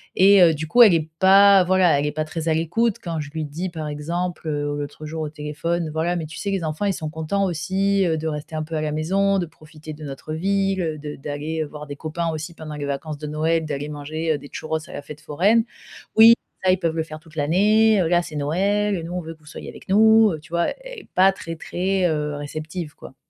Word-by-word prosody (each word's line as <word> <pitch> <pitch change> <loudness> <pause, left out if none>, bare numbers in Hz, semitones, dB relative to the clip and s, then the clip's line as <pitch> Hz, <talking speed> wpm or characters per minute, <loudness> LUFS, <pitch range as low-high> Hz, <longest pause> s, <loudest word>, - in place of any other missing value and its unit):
et 195 0 +7
heu, 165 -2 +6
du 155 +1 -5
coup 240 +7 +5
elle 205 -6 +7
est 160 -1 -1
pas. 195 0 +7
Voilà, 180 -4 +3
elle 145 - -1
est 150 - -1
pas 155 0 -2
très 160 +1 -5
à - - +3
l'écoute 195 +8 0
quand 165 -3 -3
je 145 0 -8
lui 160 -1 -3
dis 165 +6 -4
par 160 -3 -6
exemple, 170 +4 -4
heu, 145 -1 -2
l'autre 145 +1 -6
jour 160 +1 -5
au 150 - -3
téléphone, 155 +2 -3
voilà: 165 +3 -1
«Mais, 160 - -3
tu 160 - -10
sais, 200 - -3
les 190 -4 -1
enfants, 155 +6 -2
ils 195 - +1
sont 155 -2 -5
contents 160 +5 -1
aussi, 190 +3 0
heu, 160 -2 +1
de 160 +1 -3
rester 150 +1 -5
un 155 - -1
peu 160 +1 -6
à 155 - -1
la 155 -1 -2
maison, 195 +5 +1
de 175 - -1
profiter 155 -1 -12
de 150 +1 -11
notre 140 +3 -7
ville, 195 +2 0
heu, 160 -2 -2
de 150 0 -6
d'aller, 150 +3 -4
heu, 150 - -6
voir 150 0 -9
des 145 - -6
copains 165 +2 -3
aussi 160 +2 -5
pendant 155 -1 -8
les 145 -1 -4
vacances 145 +2 -4
de 150 - -6
Noël. 160 +2 0
D'aller 145 0 -4
manger, 155 +2 -2
heu, 150 - -1
des 145 0 -12
churros 160 0 -3
à - - -10
la - - -5
fête 150 +1 -10
foraine. 195 +10 +2 0.5
"Oui, 225 +1 +9 0.3
ça, 185 - +4
ils 185 - +3
peuvent 165 -3 -1
le 160 - 0
faire 155 -1 -9
toute 160 0 -19
l'année, 205 +8 +3
heu, 170 - +1
là 175 0 +4
c'est 155 - -9
Noël 200 +8 +1
et 170 - -4
nous, 170 - -6
on 180 - -2
veut 165 0 -8
que - - -30
vous - - -23
soyez - - -9
avec - - -13
nous"» 220 +1 +6
heu, - - -9
tu 150 - -18
vois? 170 0 +2 0.2
Et - - -9
pas 190 +1 +6
très, 165 -3 -7
très, 185 +3 -1
heu, 150 -2 -1
réceptive, 155 +2 -6
quoi! 130 - -13
160 Hz, 260 wpm, -22 LUFS, 155-185 Hz, 0.5 s, Oui